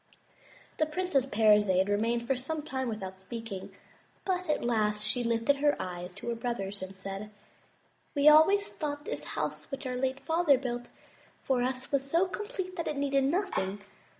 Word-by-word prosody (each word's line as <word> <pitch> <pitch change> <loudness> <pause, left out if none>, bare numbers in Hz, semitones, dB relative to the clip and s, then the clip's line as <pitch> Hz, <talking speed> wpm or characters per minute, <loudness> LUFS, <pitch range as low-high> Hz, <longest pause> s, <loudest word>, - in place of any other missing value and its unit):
The 310 - +2
Princess 305 -5 0
Parizade 210 -5 +4
remained 230 +3 +1
for 270 - +1
some 295 +5 -3
time 260 -4 -2
without 190 -4 -5
speak 225 +3 -7
ing, 190 -1 -6 0.5
but 365 -3 -1
at 300 - +1
last 210 -3 +1
she 230 +3 +1
lifted 230 +4 +2
up - - -9
her 290 -1 +4
eyes 180 0 -5
to 200 +4 -5
her 235 - -1
brothers 205 -4 -3
and 190 +1 -7
said: 195 +2 -6 0.9
"We 285 +1 +4
always 355 +7 +7
thought 290 -1 -4
this - - -4
house - - -3
which 275 0 -5
our 250 -1 -2
late 265 +1 -1
father 320 -4 +4
built 245 -2 -4 0.5
for 260 -2 +1
us 255 +2 -2
was 275 -1 0
so 335 +5 +4
complete 380 -2 -5
that 335 - -2
it 300 - -2
needed 275 -1 +2
nothing. 270 - -1
255 Hz, 180 wpm, -30 LUFS, 210-300 Hz, 0.9 s, always